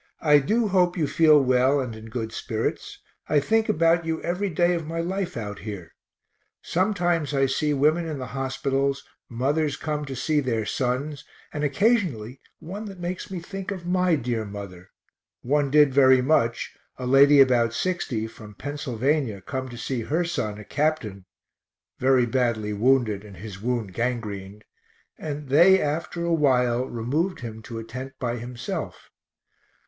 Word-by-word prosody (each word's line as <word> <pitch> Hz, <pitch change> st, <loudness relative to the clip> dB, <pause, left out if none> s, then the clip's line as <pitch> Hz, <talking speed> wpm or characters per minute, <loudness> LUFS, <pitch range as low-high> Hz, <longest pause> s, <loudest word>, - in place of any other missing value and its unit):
I 150 Hz, -2 st, +6 dB
do 220 Hz, -, +1 dB
hope 180 Hz, -1 st, +2 dB
you 160 Hz, -, +1 dB
feel 150 Hz, +1 st, +5 dB
well 130 Hz, +1 st, +3 dB
and 125 Hz, -4 st, -4 dB
in 110 Hz, +1 st, -10 dB
good 110 Hz, -1 st, -4 dB
spirits 110 Hz, 0 st, -3 dB, 0.3 s
I 150 Hz, -, +4 dB
think 220 Hz, +9 st, +1 dB
about 165 Hz, +1 st, +3 dB
you 160 Hz, 0 st, -2 dB
every 180 Hz, +4 st, -1 dB
day 175 Hz, +1 st, +2 dB
of 165 Hz, -3 st, -3 dB
my 165 Hz, +1 st, -3 dB
life 185 Hz, 0 st, -2 dB
out 105 Hz, -3 st, -5 dB
here. 100 Hz, -6 st, -8 dB, 0.7 s
Sometimes 175 Hz, -5 st, 0 dB
I 135 Hz, 0 st, +3 dB
see 150 Hz, +3 st, 0 dB
women 155 Hz, +4 st, +2 dB
in 155 Hz, -2 st, -4 dB
the 130 Hz, -, -5 dB
hospitals, 135 Hz, +1 st, -1 dB, 0.3 s
mothers 140 Hz, +4 st, 0 dB
come 150 Hz, -1 st, -3 dB
to 135 Hz, -1 st, -6 dB
see 150 Hz, +4 st, +1 dB
their 115 Hz, -6 st, -1 dB
sons, 135 Hz, +5 st, -2 dB, 0.3 s
and 150 Hz, -1 st, -3 dB
occasionally 145 Hz, -, +1 dB, 0.2 s
one 200 Hz, +6 st, -7 dB
that 195 Hz, -3 st, -9 dB
makes 175 Hz, +3 st, -4 dB
me 190 Hz, -2 st, -4 dB
think 195 Hz, +2 st, -7 dB
of 185 Hz, -4 st, -5 dB
my 180 Hz, -1 st, +2 dB
dear 120 Hz, -5 st, -2 dB
mother 100 Hz, -3 st, -9 dB, 0.5 s
one 145 Hz, +2 st, +1 dB
did 145 Hz, -1 st, +5 dB
very 130 Hz, -1 st, +6 dB
much, 120 Hz, -5 st, +1 dB, 0.2 s
a 125 Hz, -, -5 dB
lady 140 Hz, +3 st, +6 dB
about 125 Hz, -4 st, +5 dB
60, 125 Hz, -7 st, -2 dB
from 105 Hz, -2 st, -11 dB
Pennsylvania, 140 Hz, -4 st, -1 dB
come 130 Hz, +7 st, -5 dB
to 120 Hz, -, -9 dB
see 120 Hz, +1 st, -3 dB
her 160 Hz, +9 st, 0 dB
son, 110 Hz, -11 st, -3 dB
a 105 Hz, -, -10 dB
captain, 125 Hz, -12 st, -1 dB, 0.7 s
very 130 Hz, -1 st, +4 dB
badly 115 Hz, -4 st, 0 dB
wounded 110 Hz, -2 st, +2 dB
and 100 Hz, -3 st, -12 dB
his 100 Hz, 0 st, -9 dB
wound 115 Hz, -5 st, -2 dB
gangrened, 105 Hz, -4 st, -4 dB, 0.6 s
and 145 Hz, -2 st, -5 dB
they 180 Hz, +7 st, +6 dB
after 160 Hz, +3 st, -2 dB
a 170 Hz, -, +1 dB
while 125 Hz, -5 st, +2 dB
removed 140 Hz, +11 st, -2 dB
him 110 Hz, -2 st, -7 dB
to 115 Hz, +1 st, -8 dB
a 115 Hz, -, -5 dB
tent 130 Hz, +4 st, -7 dB
by 120 Hz, -1 st, -2 dB
himself. 120 Hz, +1 st, -6 dB
135 Hz, 165 wpm, -25 LUFS, 115-160 Hz, 0.7 s, I